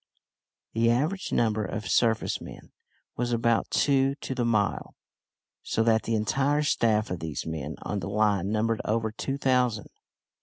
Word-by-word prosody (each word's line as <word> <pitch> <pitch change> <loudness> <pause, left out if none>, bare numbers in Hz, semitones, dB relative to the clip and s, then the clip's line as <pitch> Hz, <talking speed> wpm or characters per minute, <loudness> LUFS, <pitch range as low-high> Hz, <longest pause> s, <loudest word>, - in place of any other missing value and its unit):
The 115 +1 +2
average 155 +11 0
number 110 -2 +1
of 105 +2 -4
surface 115 -2 +1
men - - -11 0.5
was 120 0 -1
about 115 -1 +1
two 135 -1 +2
to 140 - -5
the 125 -2 -1
mile 105 -4 0 0.7
so 115 - 0
that 110 -1 +2
the 115 - 0
entire 135 +7 +1
staff 110 -7 +1
of 90 - -3
these 80 -3 -4
men 80 -2 -4
on 105 - -2
the 95 - -5
line 100 -2 +1
numbered 110 +1 0
over 110 0 0
two 135 +5 -3
thousand. 125 -6 +1
115 Hz, 155 wpm, -27 LUFS, 105-125 Hz, 0.7 s, The